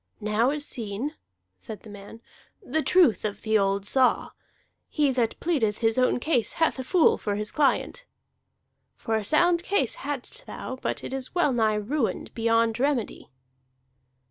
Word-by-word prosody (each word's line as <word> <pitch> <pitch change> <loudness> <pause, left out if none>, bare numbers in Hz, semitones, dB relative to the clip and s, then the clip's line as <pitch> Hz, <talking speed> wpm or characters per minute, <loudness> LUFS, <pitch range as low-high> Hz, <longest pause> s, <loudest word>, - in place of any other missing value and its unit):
"Now 215 +3 +1
is 295 +1 -3
seen," 230 +5 -4 0.5
said 210 - -9
the 220 - -13
man, 205 +3 -11 0.4
"the 315 - -2
truth 330 - +4
of 210 -2 -4
the 220 -1 +2
old 195 0 0
saw: 260 +4 +2 0.6
'He 295 -3 +1
that 240 -3 -1
pleadeth 250 -12 0
his 225 +1 +1
own 255 0 +2
cause 250 -4 0
hath 325 -4 +1
a - - -3
fool 340 +6 +3
for 205 -1 -2
his 210 +1 -3
client.' 305 - 0 0.9
For 225 - -2
a 220 - -1
sound 340 - +3
case 345 - 0
hadst 290 - -6
thou, 260 - -6
but - - -3
it - - -6
is 265 +4 -5
well 345 -6 +2
nigh 220 -3 +2
ruined 220 0 -2
beyond 230 0 +1
remedy." 270 -4 -1
245 Hz, 160 wpm, -26 LUFS, 215-295 Hz, 0.9 s, truth